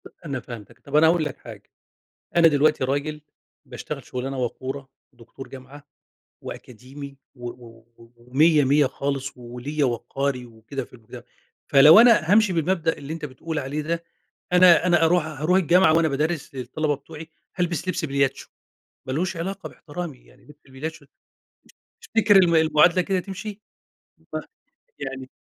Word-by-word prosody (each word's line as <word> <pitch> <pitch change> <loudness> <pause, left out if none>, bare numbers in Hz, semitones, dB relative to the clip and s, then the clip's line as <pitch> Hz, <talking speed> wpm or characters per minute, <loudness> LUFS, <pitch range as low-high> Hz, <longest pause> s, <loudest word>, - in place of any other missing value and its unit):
أ - - -20 0.2
أنا 140 -4 -3
فهمتك، 115 -4 -11
طب 140 - -7
أنا 155 +2 +6
هاقول 165 0 +3
لك 145 - -5
حاجة. - - -13 0.7
أنا 170 -1 +7
دلوقتي 150 -1 +2
راجل 145 +3 -2 0.5
باشتغل - - -7
شغلانة 130 +1 -5
وقورة، 130 +2 -4 0.2
دكتور 120 +2 -13
جامعة 135 +2 -12 0.6
وأكاديمي 135 +4 -10 0.2
و 120 -2 -7
و 115 -2 -13 0.3
ومِيّة 145 +6 +3
مِيّة 145 +2 +4
خالص، 135 0 -3
وليَّ 125 +5 -5
وقاري 125 +1 -2
وكده 115 +4 -7
في - - -24
المُجتَم 120 0 -12 0.4
فلو 150 +5 +8
أنا 230 -8 +5
هامشي 210 -2 +5
بالمبدأ 165 0 0
اللي 140 +2 -7
أنت 165 -1 -6
بتقول 155 +4 -5
عليه 145 +2 -3
ده، 165 +2 -3 0.5
أنا 180 -1 +6
أنا 175 -2 +4
أروح 165 -1 +2
هاروح 155 +4 0
الجامعة 180 -1 +4
وأنا 165 -1 +3
بادَرّس 150 +1 -2
للطلبة 145 +4 -2
بتوعي، 155 +3 -11 0.3
هالبس 175 -1 -2
لبس 180 -2 -1
بلياتشو، 140 -2 -1 0.6
ما 130 - -3
لهوش 175 +6 -2
علاقة 190 +4 -5
باحترامي، 160 -3 -8
يعني 125 - -23
لبس 150 0 -18
البلياتشو 145 +3 -7 1.0
تفتكر 225 -2 +2
الم 175 -3 +5
المعادلة 160 +3 +4
كده 190 +1 -1
تمشي؟ 195 +2 -7 0.7
صح - - -2 0.6
يعني 135 -1 -6
150 Hz, 145 wpm, -23 LUFS, 130-170 Hz, 1.0 s, فلو